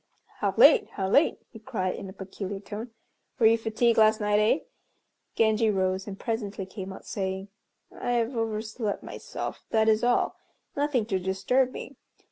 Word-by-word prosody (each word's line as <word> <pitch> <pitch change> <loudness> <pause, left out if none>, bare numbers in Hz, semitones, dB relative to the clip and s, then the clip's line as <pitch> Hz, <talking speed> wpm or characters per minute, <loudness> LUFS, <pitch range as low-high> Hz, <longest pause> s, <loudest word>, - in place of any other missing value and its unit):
"How - - 0
late, 450 -4 +7
how 190 -2 -2
late!" 280 +11 +4
he 225 - -11
cried, 210 -6 -2
in 195 - -7
a - - -7
peculiar 195 0 -6
tone. 215 +4 -7 0.5
"Were 230 - +3
you 225 +1 +7
fatigued 225 +1 +1
last 215 0 +5
night, 210 0 +2
eh?" 215 +8 +3 0.7
Genji 220 0 +3
rose 190 -1 0
and 195 -1 -7
presently 210 -4 -3
came 190 0 -7
out, 190 - -10
saying, 190 0 -3 0.5
"I 245 - -2
have 235 +1 0
overslept 220 -1 -2
myself, - - -6
that 220 0 +2
is 220 +1 +3
all; 245 0 +2 0.4
nothing 285 -6 +1
to 195 -3 -1
disturb 200 +8 +1
me. 265 0 -8
215 Hz, 165 wpm, -27 LUFS, 195-230 Hz, 0.7 s, late